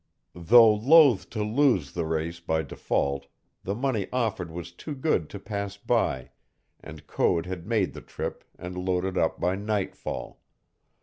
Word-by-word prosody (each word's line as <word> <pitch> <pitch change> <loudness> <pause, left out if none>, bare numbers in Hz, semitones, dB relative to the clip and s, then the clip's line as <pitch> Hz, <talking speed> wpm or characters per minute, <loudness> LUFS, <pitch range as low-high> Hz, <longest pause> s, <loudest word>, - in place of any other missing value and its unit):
Though 110 +6 +6
loath 135 +1 +5
to 110 -2 -3
lose 105 - +2
the 80 - -3
race 80 +1 -2
by 80 -1 -1
default, 70 -1 -2 0.4
the 100 - -2
money 120 -5 -1
offered 110 -9 -1
was 85 +1 -7
too 145 - -7
good 130 - 0
to 100 - -8
pass 100 -1 -5
by, 65 -8 0 0.5
and - - -11
Code 85 -1 +1
had 90 -1 -6
made 105 -8 +1
the - - -9
trip - - -6
and 90 +1 -7
loaded 90 0 -1
up 80 - 0
by 90 +2 +1
nightfall. 105 -1 -4
95 Hz, 150 wpm, -26 LUFS, 85-110 Hz, 0.5 s, Though